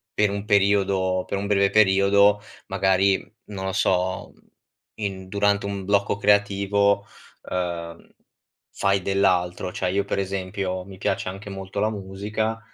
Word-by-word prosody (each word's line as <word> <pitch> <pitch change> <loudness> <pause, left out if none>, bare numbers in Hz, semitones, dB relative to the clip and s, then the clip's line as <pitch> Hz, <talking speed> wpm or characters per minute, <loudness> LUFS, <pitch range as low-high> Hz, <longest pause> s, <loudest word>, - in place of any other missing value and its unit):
per 105 -1 +2
un 100 +1 -4
periodo, 95 -2 +2
per 100 - -2
un 100 - -3
breve 100 -1 +3
periodo, 100 0 +4 0.3
magari 95 0 +2 0.3
non 95 -2 -6
lo 95 - -1
so, 95 -1 0 0.6
in 95 -3 -5
durante 100 0 +1
un 100 -1 -4
blocco 100 0 +1
creativo, 100 0 +2 0.4
uhm, 85 -2 -4 0.6
fai 100 -1 +1
dell'altro. 90 -2 +1
Cioè 90 - -2
io, 100 +1 0
per 100 - -2
esempio, 95 -1 -3
mi 95 -1 -11
piace 95 - -1
anche 100 +2 -8
molto 95 0 -6
la 105 +2 +1
musica, 105 +3 -3
100 Hz, 135 wpm, -24 LUFS, 95-100 Hz, 0.6 s, periodo